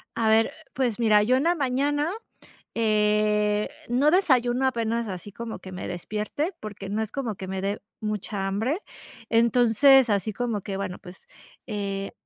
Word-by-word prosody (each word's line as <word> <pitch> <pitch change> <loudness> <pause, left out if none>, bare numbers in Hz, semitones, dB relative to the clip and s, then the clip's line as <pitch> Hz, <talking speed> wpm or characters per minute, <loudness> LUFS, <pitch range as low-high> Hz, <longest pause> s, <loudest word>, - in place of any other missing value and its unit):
A 225 -1 +1
ver, 225 +1 +4 0.2
pues 245 -4 -1
mira, 215 -3 +5
yo 250 +4 +3
en 265 - +1
la 345 +1 +3
mañana, 290 +2 0 0.7
eh, 210 -1 +2 0.2
no 270 +5 +3
desayuno 260 -8 +3
apenas 230 -2 -1
así 190 +1 -6
como 230 +2 -6
que 185 - -10
me 180 - -6
despierte, 215 - -3
porque 205 -2 -7
no 210 +2 -1
es 220 -1 -3
como 240 -6 -3
que 190 0 -7
me 190 0 -3
dé 200 +1 -2 0.2
mucha 210 -2 -3
hambre. 220 - 0 0.5
Entonces, 240 +3 +5
así 205 +1 0
como 230 -3 -2
que, 195 0 -5
bueno, 185 -2 -4
pues, 180 +1 -12 0.4
eh, 200 -3 -3
220 Hz, 160 wpm, -25 LUFS, 205-250 Hz, 0.7 s, mira